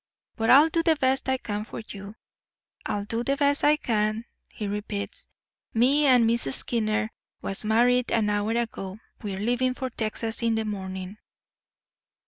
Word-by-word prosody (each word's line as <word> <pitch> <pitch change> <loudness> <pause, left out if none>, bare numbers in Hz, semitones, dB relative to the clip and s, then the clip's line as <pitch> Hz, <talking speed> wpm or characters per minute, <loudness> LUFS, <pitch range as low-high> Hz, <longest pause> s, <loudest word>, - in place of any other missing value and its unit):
But 225 -1 -1
I'll 290 +5 +8
do 330 +1 +1
the 325 -1 +3
best 265 -2 +1
I 260 - +2
can 210 -4 -4
for - - -8
you—I'll 200 0 -8
do 230 +2 -2
the 275 +2 0
best 285 0 +2
I 300 +1 +5
can,' 215 -3 -1 0.3
he 210 - -5
repeats. 205 - -4 0.5
'Me 275 +6 +4
and 250 -3 +6
Miss 230 -7 +1
Skinner 220 -1 0 0.3
was 195 - -1
married 245 +3 +3
an 220 -2 +2
hour 205 +2 0
ago. 220 -5 -3 0.2
We're 200 -3 -4
leaving 245 +4 +1
for 260 -1 -4
Texas 225 +1 -3
in 230 -1 +2
the 220 0 -1
morning. 190 -1 -5
225 Hz, 155 wpm, -26 LUFS, 210-255 Hz, 0.5 s, I'll